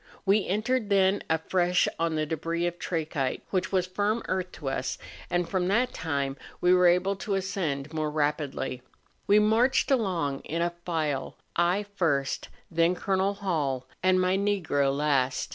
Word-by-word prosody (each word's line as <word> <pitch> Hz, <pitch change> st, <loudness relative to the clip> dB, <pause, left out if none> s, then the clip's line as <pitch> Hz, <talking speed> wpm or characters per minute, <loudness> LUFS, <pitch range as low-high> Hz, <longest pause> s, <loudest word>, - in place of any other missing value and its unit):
We 200 Hz, +1 st, +3 dB
entered 215 Hz, +3 st, 0 dB
then 195 Hz, 0 st, +3 dB
afresh 175 Hz, +2 st, +2 dB
on 165 Hz, -1 st, 0 dB
the 155 Hz, 0 st, 0 dB
debris 165 Hz, +2 st, -2 dB
of 175 Hz, 0 st, -3 dB
trachyte, 155 Hz, -6 st, -2 dB
which 185 Hz, -1 st, 0 dB
was 185 Hz, -2 st, +2 dB
firm 205 Hz, +5 st, -1 dB
earth 185 Hz, -1 st, -2 dB
to 145 Hz, -1 st, -8 dB
us, 135 Hz, -1 st, -2 dB, 0.3 s
and 175 Hz, -1 st, 0 dB
from 180 Hz, -1 st, 0 dB
that 240 Hz, +6 st, +2 dB
time 140 Hz, -4 st, -2 dB, 0.2 s
we 180 Hz, +1 st, +4 dB
were 180 Hz, -1 st, +5 dB
able 180 Hz, +3 st, +3 dB
to 195 Hz, +2 st, -2 dB
ascend 160 Hz, -7 st, -2 dB
more 155 Hz, -1 st, -1 dB
rapidly. 145 Hz, -4 st, -2 dB, 0.5 s
We 205 Hz, -, +6 dB
marched 225 Hz, +7 st, +3 dB
along 175 Hz, -, +1 dB
in 165 Hz, +2 st, -2 dB
a 175 Hz, 0 st, -1 dB
file, 155 Hz, -6 st, -2 dB, 0.2 s
I 175 Hz, +4 st, +2 dB
first, 165 Hz, -9 st, -1 dB, 0.2 s
then 170 Hz, +2 st, +3 dB
Col. 195 Hz, +2 st, 0 dB
Hall, 150 Hz, -10 st, -1 dB, 0.2 s
and 185 Hz, 0 st, +4 dB
my 185 Hz, 0 st, +2 dB
Negro 175 Hz, -9 st, +1 dB
last. 140 Hz, -2 st, +1 dB
175 Hz, 160 wpm, -27 LUFS, 150-195 Hz, 0.5 s, We